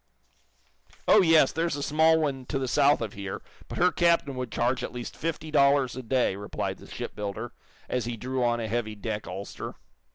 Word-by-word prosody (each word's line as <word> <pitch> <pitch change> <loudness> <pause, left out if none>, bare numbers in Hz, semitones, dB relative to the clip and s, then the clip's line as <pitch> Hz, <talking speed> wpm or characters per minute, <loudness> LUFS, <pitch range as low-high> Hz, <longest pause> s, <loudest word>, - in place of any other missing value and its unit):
"Oh, 210 - +7
yes; 160 -6 +5
there's 165 -1 -1
a 145 - -3
small 160 +2 +4
one 135 -5 -2
to 140 - -1
the 135 -1 -2
south 145 +2 +4
of 110 -3 -3
here, 100 -1 -6 0.2
but - - -6
her 180 +1 +4
captain 170 -5 +2
would 125 -1 -4
charge 125 +2 0
at - - -4
least 125 -1 -6
fifty 160 -1 -4
dollars 140 -3 +4
a 130 - -5
day," 125 -4 +1
replied 100 +1 -4
the - - -13
shipbuilder, 105 +3 -5 0.4
as 125 -2 -1
he 120 -1 -4
drew 130 +2 -2
on 120 0 +2
a 115 - -2
heavy 110 -1 -2
deck 105 0 -4
ulster. 95 +2 -6
130 Hz, 195 wpm, -27 LUFS, 115-150 Hz, 0.4 s, Oh